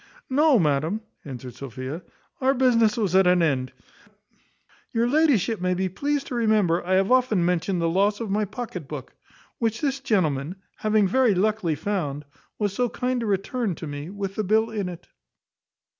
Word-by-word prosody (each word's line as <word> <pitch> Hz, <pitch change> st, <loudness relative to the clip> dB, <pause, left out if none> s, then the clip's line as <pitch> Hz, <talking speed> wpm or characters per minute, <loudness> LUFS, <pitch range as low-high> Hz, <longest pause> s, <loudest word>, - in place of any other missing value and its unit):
"No, 290 Hz, 0 st, +5 dB
madam," 160 Hz, +4 st, +1 dB, 0.2 s
answered 125 Hz, -3 st, -8 dB
Sophia, 135 Hz, +5 st, -6 dB, 0.4 s
"our 265 Hz, +1 st, +3 dB
business 235 Hz, -4 st, +3 dB
was 200 Hz, -6 st, 0 dB
at 190 Hz, -1 st, +5 dB
an 180 Hz, -1 st, +4 dB
end. 130 Hz, -5 st, 0 dB, 1.2 s
Your 235 Hz, 0 st, +2 dB
ladyship 250 Hz, -, +2 dB
may 180 Hz, 0 st, +1 dB
be 190 Hz, +1 st, -1 dB
pleased 285 Hz, +9 st, -2 dB
to -, -, -7 dB
remember 215 Hz, -7 st, +2 dB
I 185 Hz, +2 st, -1 dB
have 195 Hz, +4 st, +2 dB
often 250 Hz, -8 st, +3 dB
mentioned 180 Hz, +1 st, 0 dB
the -, -, +2 dB
loss 200 Hz, +5 st, +2 dB
of 225 Hz, -4 st, -4 dB
my 210 Hz, +1 st, +1 dB
pocket 200 Hz, -, -6 dB
book, 140 Hz, -4 st, -7 dB, 0.5 s
which 225 Hz, -1 st, 0 dB
this 275 Hz, -2 st, 0 dB
gentleman, 175 Hz, -, 0 dB, 0.2 s
having 215 Hz, -2 st, +2 dB
very 245 Hz, 0 st, +3 dB
luckily 195 Hz, -4 st, +1 dB
found, 150 Hz, -6 st, -3 dB, 0.3 s
was 205 Hz, -2 st, -1 dB
so 245 Hz, +3 st, 0 dB
kind 250 Hz, +2 st, -1 dB
to 230 Hz, -, -3 dB
return 205 Hz, +2 st, -1 dB
it -, -, -12 dB
to -, -, -6 dB
me 145 Hz, +1 st, -6 dB
with 195 Hz, 0 st, -4 dB
the 215 Hz, -, -2 dB
bill 220 Hz, +3 st, +2 dB
in 205 Hz, -4 st, -2 dB
it." 175 Hz, -2 st, -10 dB
200 Hz, 175 wpm, -24 LUFS, 170-230 Hz, 1.2 s, No